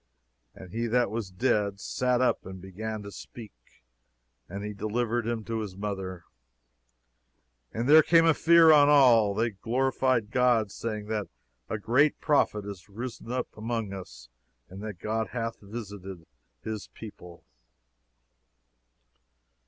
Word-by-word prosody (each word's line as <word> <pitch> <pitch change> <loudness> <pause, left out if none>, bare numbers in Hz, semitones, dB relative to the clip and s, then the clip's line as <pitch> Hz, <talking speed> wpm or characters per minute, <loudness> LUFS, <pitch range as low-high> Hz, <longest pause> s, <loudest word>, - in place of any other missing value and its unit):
"And 95 -2 -12
he 115 +1 -1
that 120 +1 +1
was 110 -3 -3
dead 100 -1 0
sat 125 +3 0
up, 125 - +1
and 95 0 -9
began 105 +3 -6
to 100 - -8
speak. 110 0 -11 1.0
And 100 +3 -6
he 105 - -5
delivered 115 +3 -2
him 115 -2 -2
to 115 +1 -3
his 100 -4 -6
mother. 95 -3 -5 1.5
"And 115 +3 -3
there 155 +2 +9
came 165 +1 +4
a 165 - +5
fear 165 +1 +6
on 145 -1 +6
all. 120 -8 +6
And - - 0
they 115 +1 +2
glorified 125 +1 0
God, 120 -5 +2
saying, 105 -1 -4
That 105 -2 -2 0.4
a 110 - -2
great 130 +8 +2
prophet 125 -9 +1
is 100 -2 -9
risen 115 +2 -7
up 125 0 -3
among 110 -2 -3
us; 60 -11 -10 0.4
and 95 +2 -10
That 105 -3 -6
God 110 +4 -2
hath 115 -2 -3
visited 100 -5 -8 0.4
his 110 -2 -5
people." 90 -6 -12
110 Hz, 140 wpm, -28 LUFS, 100-120 Hz, 1.5 s, there